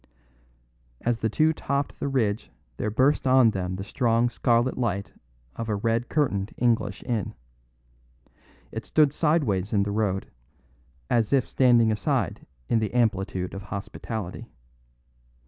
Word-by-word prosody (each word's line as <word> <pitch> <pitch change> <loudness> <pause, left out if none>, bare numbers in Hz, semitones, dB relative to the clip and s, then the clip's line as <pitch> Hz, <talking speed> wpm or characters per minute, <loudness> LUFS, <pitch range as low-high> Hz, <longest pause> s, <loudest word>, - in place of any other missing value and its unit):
As 120 -1 0
the 110 - 0
two 155 +8 +3
topped 140 -2 -2
the - - -2
ridge 115 -6 0 0.3
there 105 - -1
burst 130 +6 +2
on 130 -3 +6
them 95 -2 -3
the 95 - -5
strong 115 +2 +1
scarlet 120 +1 +1
light 100 -5 -2 0.4
of 115 -1 -5
a 105 - +1
red 115 +3 0
curtained 105 -10 0
English 115 -5 0
inn. 115 -6 -2 1.4
It - - -5
stood 150 -3 +3
sideways 135 - +1
in 100 -2 +3
the 100 - -2
road, 100 -3 -1 0.8
as 115 -3 +2
if 135 -3 +3
standing 120 -4 +4
aside 105 -2 -1 0.2
in 115 - +2
the 110 +2 -3
amplitude 95 -6 0
of 95 - -6
hospitality. 100 +1 -6
115 Hz, 135 wpm, -26 LUFS, 100-125 Hz, 1.4 s, on